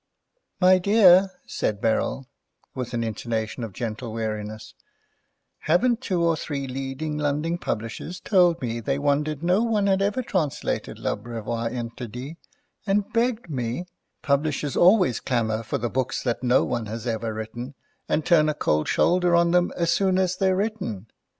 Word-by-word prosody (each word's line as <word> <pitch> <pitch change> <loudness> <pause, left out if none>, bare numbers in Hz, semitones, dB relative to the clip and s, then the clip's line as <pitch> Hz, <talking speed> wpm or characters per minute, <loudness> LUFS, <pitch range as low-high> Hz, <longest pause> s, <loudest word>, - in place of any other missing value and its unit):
"My 185 0 +6
dear," 195 -1 +6 0.2
said 105 -2 -2
Beryl, 115 +4 0 0.5
with 125 -2 -4
an 115 - -1
intonation 115 +1 -3
of 115 - -5
gentle 115 +2 -5
weariness, 110 -1 -5 0.9
"haven't 235 +9 +2
two 180 -8 0
or 165 -1 +3
three 145 -3 -4
leading 135 +3 -4
London 150 +4 -1
publishers 115 +11 -4
told 175 -5 +3
me 120 -1 -2
they 135 +4 -1
wondered 145 +1 0
no 180 +4 +3
one 220 -3 +1
had 195 -1 +2
ever 205 +6 0
translated 165 - -2
L'Abreuvoir 115 +1 -3
interdit, 125 +4 -6 0.5
and 200 +1 0
begged 235 -1 0
me—" 125 +2 -3 0.4
"Publishers 145 0 0
always 180 - +5
clamour 115 -3 -1
for 115 - -3
the 120 - -2
books 130 +1 -2
that 120 -2 -1
no 125 0 +3
one 115 -2 -2
has 110 +1 -6
ever 115 -1 -2
written, 115 +5 -6 0.3
and 155 - 0
turn 155 -3 +4
a 150 - -1
cold 75 - 0
shoulder 180 -1 +3
on 170 0 +4
them 180 0 +3
as 170 -1 +2
soon 190 -2 +2
as 185 -1 +1
they're 190 0 +2
written. 190 - -3
145 Hz, 155 wpm, -24 LUFS, 115-180 Hz, 0.9 s, My